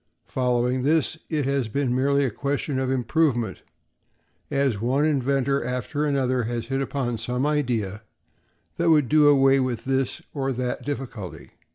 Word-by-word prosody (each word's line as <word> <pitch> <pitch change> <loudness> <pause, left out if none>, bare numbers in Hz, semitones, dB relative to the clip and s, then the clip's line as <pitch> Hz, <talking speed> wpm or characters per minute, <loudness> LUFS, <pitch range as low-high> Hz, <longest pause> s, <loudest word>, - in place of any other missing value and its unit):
Following 125 0 0
this, 155 +3 +1
it 150 -4 0
has 135 -3 0
been 125 +2 -1
merely 140 +2 +2
a 125 - -1
question 140 +2 -2
of 130 -1 -1
improvement, 125 - 0 0.9
as 135 -7 0
one 135 +5 +2
inventor 140 -2 +1
after 125 +4 -2
another 130 -4 +1
has 120 0 -3
hit 135 0 -2
upon 130 -4 -2
some 125 +4 -1
idea 120 -9 -1 0.8
that 170 0 +2
would 150 -5 +4
do 150 +2 +5
away 135 -1 +5
with 130 -3 -2
this 135 -1 0
or 135 -2 -1
that 125 0 -3
difficulty. 125 -9 -6
135 Hz, 150 wpm, -24 LUFS, 125-140 Hz, 0.9 s, do